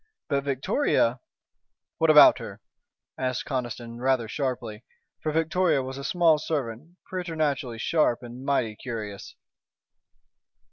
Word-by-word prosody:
But 140 0 0
Victoria 135 - +1 0.4
" - - -60
"What 165 - +3
about 150 -1 +8
her?" - - -8 0.6
asked 130 -1 -2
Conniston, 120 -3 -4
rather 130 -2 +1
sharply, 120 -4 -4 0.4
for 155 - -1
Victoria 160 -2 +1
was 130 +1 -6
a - - -6
small 165 -1 +3
servant, 150 +2 -4
preternaturally 155 -9 -2
sharp 125 -2 +1
and 120 +2 -9
mighty 125 -6 0
curious. 110 -5 -7
135 Hz, 120 wpm, -26 LUFS, 120-155 Hz, 0.6 s, about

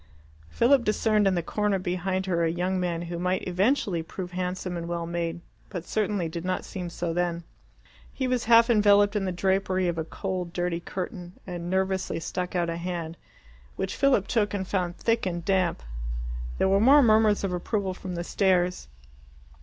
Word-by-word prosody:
Philip 250 - +4
discerned 215 -1 +2
in 190 - +2
the 175 - -1
corner 210 +2 0
behind 185 +1 -2
her 170 -3 +1
a 165 - +2
young 180 +3 -1
man 175 -2 -1
who 170 0 -5
might 180 +1 -1
eventually 190 -1 +1
prove 180 +2 -7
handsome 180 0 -3
and 170 -1 -4
well 170 -1 -2
made, 170 0 -3 0.3
but 180 -4 -6
certainly 205 -5 0
did 165 +1 -5
not 185 0 -2
seem 180 -3 -5
so 170 0 -3
then. 170 -1 -1 0.7
He 260 - -2
was 250 -1 0
half 230 0 +7
enveloped 205 -2 +4
in 200 -2 0
the 185 - -1
drapery 190 0 +1
of 170 -1 -1
a - - 0
cold 180 0 -4
dirty 175 -1 -1
curtain, 180 0 -6
and 175 -2 -5
nervously 190 -2 0
stuck 180 +2 -4
out 175 -1 +1
a 165 0 -3
hand, 170 -2 -4 0.6
which - - -3
Philip 260 -8 +3
took 210 -2 0
and 190 -2 -3
found 180 -3 -1
thick 230 -3 +1
and 175 -2 -3
damp. 185 - +1 0.7
There - - +2
were 195 +1 +4
more 280 +5 +7
murmurs 215 -3 +4
of 190 -2 -1
approval 190 +2 -1
from 185 -1 -6
the 170 - -3
stairs. 180 -1 +1
185 Hz, 185 wpm, -27 LUFS, 175-200 Hz, 0.7 s, half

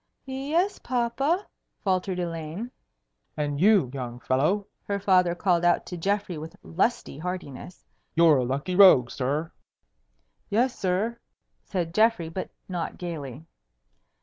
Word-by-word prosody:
"Y 265 - -7
yes, 315 +9 0
papa," 260 - 0 0.4
faltered 185 -1 0
Elaine. 170 +6 -4 0.7
"And 145 -1 -1
you, 195 - +5
young 125 -3 -5
fellow!" 145 - +1 0.2
her 200 -1 -2
father 180 -3 +3
called 175 -2 +1
out 175 0 +3
to 180 - -6
Geoffrey 195 -1 -1
with 160 +1 -8
lusty 195 - -1
heartiness. 180 -1 -6 0.3
"You're 165 -3 +6
a 130 - +1
lucky 140 +8 -2
rogue, 180 -11 +7
sir." 145 +5 -2 1.0
"Yes, 245 +5 +2
sir," 200 +6 -1 0.4
said 170 -4 -3
Geoffrey, 215 -6 +3
but 185 +3 -5 0.2
not 175 -3 -4
gayly. 155 -5 -6
180 Hz, 125 wpm, -26 LUFS, 155-205 Hz, 1.0 s, rogue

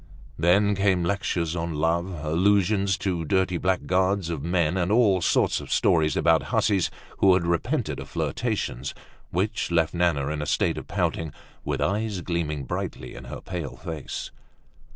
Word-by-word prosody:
Then 100 +5 +4
came 95 -2 +2
lectures 85 -3 -1
on 85 -1 -3
love, 85 +3 +1 0.2
allusions 95 +4 +2
to 90 -3 -2
dirty 90 +1 +1
blackguards 95 0 +1
of 80 -4 -3
men, 85 0 +1
and 90 0 0
all 105 -5 +4
sorts - - +2
of - - -9
stories 80 -1 +3
about - - +3
hussies 95 -4 +2 0.3
who 95 -2 +6
had 90 -2 0
repented 85 -1 -1
of - - -8
flirtations, 65 +3 -2 0.3
which 100 +4 -1
left 85 -2 +2
Nana 85 -5 +1
in 75 -1 -3
a 75 - -3
state 75 - +1
of - - -11
pouting, 80 -2 -1 0.3
with - - -2
eyes 105 -1 -1
gleaming 80 -4 -2
brightly - - -5
in - - -10
her - - -7
pale 85 -7 -5
face. 80 -4 -6
90 Hz, 155 wpm, -25 LUFS, 80-95 Hz, 0.3 s, who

